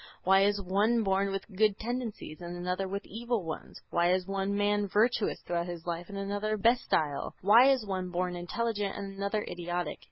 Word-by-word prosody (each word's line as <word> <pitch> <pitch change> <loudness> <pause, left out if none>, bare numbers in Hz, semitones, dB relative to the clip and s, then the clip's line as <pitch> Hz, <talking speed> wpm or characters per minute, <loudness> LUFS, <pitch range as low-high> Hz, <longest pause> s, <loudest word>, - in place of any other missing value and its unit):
Why 195 +1 +5
is 205 0 +1
one 205 +5 +2
born 195 0 +1
with 195 0 -3
good 210 0 +3
tendencies 230 -8 -5
and 175 0 -6
another 180 +2 -2
with 200 +2 -4
evil 235 0 -2
ones? 160 - -6
Why 175 +1 +3
is 185 0 +1
one 195 +1 -1
man 205 0 +2
virtuous 215 +3 +1
throughout 170 0 -2
his 175 -2 -7
life 170 +1 -4
and 200 - -6
another 205 +2 -1
bestial? 195 - +1
Why 230 +7 +7
is 260 -5 +2
one 185 -2 -3
born 180 0 -1
intelligent 205 +3 -2
and 200 -1 -5
another 200 +2 -1
idiotic? 175 0 -3
195 Hz, 185 wpm, -30 LUFS, 180-215 Hz, -, Why